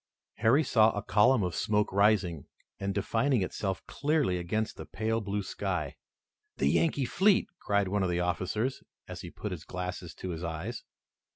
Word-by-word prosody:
Harry 120 +7 +4
saw 110 -6 +5
a 105 - -2
column 105 +4 +4
of 90 -2 -1
smoke 105 -1 0
rising, 100 -6 +2 0.3
and 100 0 -2
defining 115 +3 +1
itself 95 +1 -3
clearly 145 - 0
against 110 +6 -2
the - - -9
pale 110 +1 -1
blue 100 0 -2
sky. 90 -7 -3 0.6
"The 70 - +2
Yankee 145 - +2
fleet!" 190 - +3
cried 100 -1 +1
one 100 +2 0
of 95 - +1
the 90 0 0
officers, 95 +8 -1 0.3
as - - -7
he - - -7
put - - -6
his - - -6
glasses 90 -1 -5
to 95 - -6
his 85 0 -5
eyes. 80 -1 -4
100 Hz, 170 wpm, -30 LUFS, 90-110 Hz, 0.6 s, saw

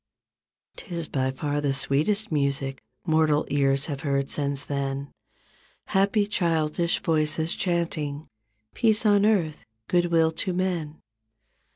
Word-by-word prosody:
Tis 170 -6 -4
by 130 -1 -1
far 145 +2 -2
the 140 -2 0
sweetest 200 +11 +1
music 140 -2 -1 0.2
Mortal 155 -2 +2
ears 140 -1 +2
have 145 -4 -4
heard 140 -2 -1
since 140 -1 0
then, 140 0 -3 0.7
Happy 200 +2 +2
childish 170 -4 0
voices 160 0 +1
chanting 160 -4 -2 0.5
"Peace 220 -2 +2
on 205 0 +5
earth, 175 -8 0 0.2
good 175 -1 +2
will 165 -1 +3
to 180 +3 -3
men." 175 -4 -2
155 Hz, 115 wpm, -25 LUFS, 140-175 Hz, 0.7 s, on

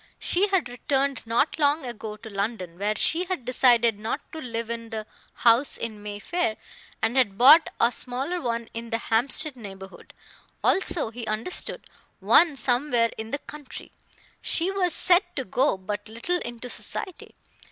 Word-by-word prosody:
She 380 +4 +1
had 385 -9 0
returned 270 +1 -2
not 240 +8 0
long 290 0 +2
ago 220 -3 -7
to 220 +1 -12
London, 200 -4 -4
where 210 +1 -1
she 335 - +3
had 360 -9 -4
decided 240 -3 +3
not 220 +6 -3
to 320 - -8
live 230 -3 -5
in 230 -1 -6
the 220 -2 -5 0.3
house 240 +4 +3
in 220 -3 -6
Mayfair, 210 - -3 0.5
and 225 +3 0
had 205 -7 +2
bought 295 +7 +7
a 235 - +3
smaller 270 +9 -3
one 235 -2 -3
in 230 0 -7
the 225 - 0
Hampstead 260 +6 +3
neighborhood; 195 -4 -12 0.5
also, 340 -10 +1
he 230 -1 -8
understood, 215 +11 -3 0.3
one 330 -4 +4
somewhere 245 -2 +1
in 220 0 -6
the 285 - -2
country. 295 -1 -11 0.5
She 355 +3 0
was 370 -3 +2
said 360 0 +6
to 265 - -2
go 255 +2 0
but 205 +2 -6
little 285 +11 -1
into 240 -2 -7
society. 360 - -3
240 Hz, 160 wpm, -25 LUFS, 220-295 Hz, 0.5 s, bought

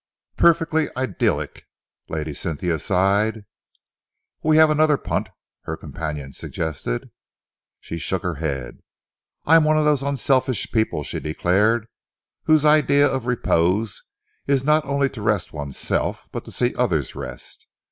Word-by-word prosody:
"Perfectly 160 -2 +3
idyllic," 130 0 -1 0.4
Lady 75 -1 -3
Cynthia 80 +2 -2
sighed. 100 +5 +1 1.0
"We 155 0 +3
have 155 -1 +6
another 155 -1 +3
punt," - - -2 0.4
her - - -4
companion 75 -3 -6
suggested. 75 -7 -4 0.7
She 85 - -6
shook 95 +2 -2
her 90 -2 -1
head. 70 -6 -4 0.7
"I 165 +2 +7
am 160 - +4
one 155 0 +3
of 155 - +2
those 150 -3 +3
unselfish 135 -2 0
people," 110 -9 0
she - - -4
declared, 100 +8 +1 0.6
"whose 155 -1 +4
idea 150 -1 +5
of 130 -3 -3
repose 105 -3 +1 0.5
is 140 -2 +2
not 150 +2 +3
only 140 0 +1
to 115 - -9
rest 105 -2 0
oneself 70 -3 -3
but - - -6
to - - -10
see - - 0
others - - 0
rest. - - -9
110 Hz, 135 wpm, -22 LUFS, -, 1.0 s, I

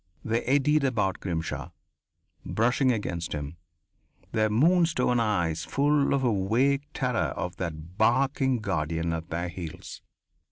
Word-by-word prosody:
They 115 +1 +1
eddied 145 +3 +3
about 105 -8 0
Grimshaw, 85 -4 -3 0.7
brushing 125 +3 +2
against 85 -8 -3
him, 75 +2 -5 0.7
their 110 0 +2
moon 165 +10 +4
stone 125 -6 +1
eyes 85 -8 0
full 145 0 +2
of 135 - -1
a 100 -6 0
vague 140 +5 +2
terror 125 -3 -1
of 90 - -4
that 85 +1 -6
barking 130 +3 +2
guardian 85 -3 -1
at 80 +1 -5
their 85 +2 -2
heels. 85 -3 -8
110 Hz, 130 wpm, -27 LUFS, 85-135 Hz, 0.7 s, moon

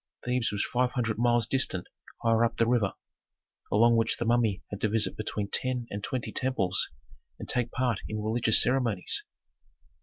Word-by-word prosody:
Thebes 125 -1 0
was 100 -1 -1
five 125 0 -1
hundred 115 -4 -2
miles 120 -1 +3
distant 110 -8 0 0.4
higher 115 0 +3
up 115 0 -1
the 115 - +3
river, 115 -4 0 0.8
along 115 +3 +4
which 115 0 +1
the 120 - -3
mummy 115 -4 +1
had 100 - -6
to 110 - +1
visit 110 +1 +2
between 105 -1 -3
ten 125 +3 +1
and 100 0 -5
twenty 130 -3 -3
temples 100 -9 +1 0.5
and - - -9
take 120 -1 +1
part 125 -5 -1
in 110 - -4
religious 110 +1 +3
ceremonies. 120 -7 +1
115 Hz, 170 wpm, -28 LUFS, 105-125 Hz, 0.8 s, along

